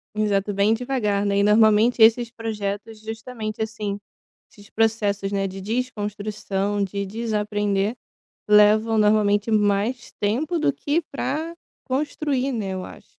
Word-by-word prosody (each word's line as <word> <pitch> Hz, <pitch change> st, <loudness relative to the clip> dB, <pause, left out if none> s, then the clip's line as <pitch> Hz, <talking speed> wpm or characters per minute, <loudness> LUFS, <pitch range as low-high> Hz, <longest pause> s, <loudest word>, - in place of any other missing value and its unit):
Exato, 205 Hz, -1 st, 0 dB
bem 200 Hz, +3 st, +3 dB
devagar, 225 Hz, -5 st, -1 dB
né. 200 Hz, 0 st, +1 dB
E -, -, +3 dB
normalmente 220 Hz, +3 st, +4 dB
esses 230 Hz, +1 st, +5 dB
projetos 215 Hz, -1 st, -5 dB
justamente, 220 Hz, 0 st, -6 dB
assim, 215 Hz, -2 st, -3 dB, 0.5 s
esses 205 Hz, 0 st, -17 dB
processos, 210 Hz, -3 st, 0 dB
né, 195 Hz, -1 st, 0 dB
de 190 Hz, 0 st, -8 dB
desconstrução, 205 Hz, -3 st, -2 dB
de 200 Hz, +1 st, -3 dB
desaprender, 210 Hz, -1 st, -1 dB, 0.5 s
levam 210 Hz, +2 st, +5 dB
normalmente 210 Hz, 0 st, +3 dB
mais 210 Hz, +4 st, +1 dB
tempo 280 Hz, +12 st, 0 dB
do 285 Hz, -, +2 dB
que 295 Hz, +5 st, -1 dB
pra 315 Hz, +4 st, -3 dB, 0.3 s
construir, 275 Hz, -1 st, -1 dB
né, 205 Hz, -5 st, -3 dB
eu 185 Hz, -1 st, -4 dB
acho. -, -, -13 dB
215 Hz, 125 wpm, -23 LUFS, 205-230 Hz, 0.5 s, esses